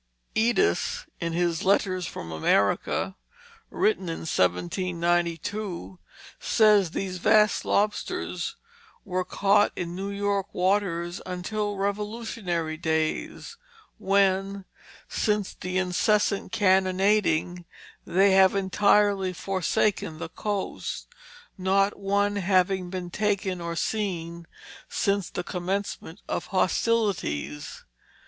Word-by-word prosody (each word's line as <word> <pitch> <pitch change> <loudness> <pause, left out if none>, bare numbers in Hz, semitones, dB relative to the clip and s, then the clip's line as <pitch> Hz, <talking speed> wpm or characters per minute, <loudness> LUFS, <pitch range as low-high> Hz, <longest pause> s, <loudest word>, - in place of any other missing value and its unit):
Eddis, 240 - +1
in 170 -2 -2
his 170 -1 0
Letters 185 -1 +2
from 80 - -7
America, 100 - +1 0.5
written 385 - 0
in 165 - -4
1792, 170 - -1 0.4
says 210 -5 +4
these 185 +2 -4
vast 215 +2 +4
lobsters 210 +1 -1 0.5
were 185 -2 -1
caught 200 +2 +3
in 175 -1 -4
New 195 +2 -4
York 200 -1 -2
waters 180 -2 0
until 205 +3 -3
Revolutionary 200 -5 -2
days, 160 - -2 0.4
when 195 0 +1 0.4
"since 210 -3 -1
the 180 +1 -4
incessant 195 +2 +1
cannonading, 185 -3 +2 0.4
they 195 +3 +3
have 190 0 +5
entirely 200 0 +3
forsaken 185 -2 -1
the 165 - -6
coast; 205 +3 -4 0.5
not 195 +2 +2
one 200 +1 +1
having 185 -1 +1
been 180 -1 -5
taken 195 -3 -1
or 170 0 -4
seen 170 -5 -3 0.4
since 200 -3 0
the 180 - -4
commencement 185 0 -4
of - - -3
hostilities." 185 - -1
190 Hz, 95 wpm, -26 LUFS, 175-205 Hz, 0.5 s, have